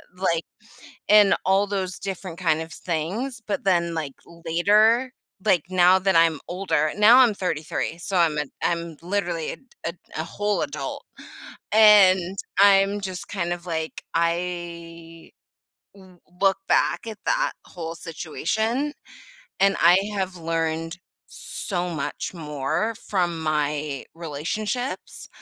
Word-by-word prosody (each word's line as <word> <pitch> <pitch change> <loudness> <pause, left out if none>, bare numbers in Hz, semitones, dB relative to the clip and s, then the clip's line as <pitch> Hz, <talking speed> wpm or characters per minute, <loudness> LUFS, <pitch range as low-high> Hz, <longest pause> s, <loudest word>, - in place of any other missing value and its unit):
like 170 -3 0 0.6
and 210 -1 +6
all 195 +2 +3
those 190 -2 -3
different 185 -3 -6
kind 160 -3 +2
of 160 - -6
s - - -11
things, 195 - -3
but 205 - -3
then, 170 -3 +2
like, 155 -4 -4
later 205 +10 +2 0.3
like, 185 -7 +3
now 185 0 +6
that 190 -1 +1
I'm 165 -2 +4
older 180 -4 0
now, 225 +5 +7
I'm 240 -5 +6
33, 165 -1 -3
so 185 +2 -2
I'm 160 -3 +3
a 150 - -1 0.2
I'm 170 -2 -2
literally 175 -4 -2
a - - -6
d - - -27 0.2
a 170 - -2 0.3
a - - -3
whole 205 +4 -1
adult, 140 -2 -5 0.7
and 195 -4 +6 0.2
I'm 200 0 +5
just 185 -2 -6
kind 175 -3 -2
of, 175 0 -9
like, 160 -1 -3
I 170 -1 -3 0.6
w 185 -2 -17 0.2
look 195 -1 +4
back - - +2
at 220 -1 -7
that - - +1
whole 165 -1 -7
situation, 220 - -2 0.7
and 195 0 +4
I 175 +2 +7 0.2
have 190 -2 -2
learned 165 0 -2 0.3
so 180 -3 -5
much 155 +3 -4
more 150 +7 -2
from 175 -4 0
my 150 -2 -1
relationships, 205 - -4
175 Hz, 130 wpm, -24 LUFS, 165-200 Hz, 0.7 s, now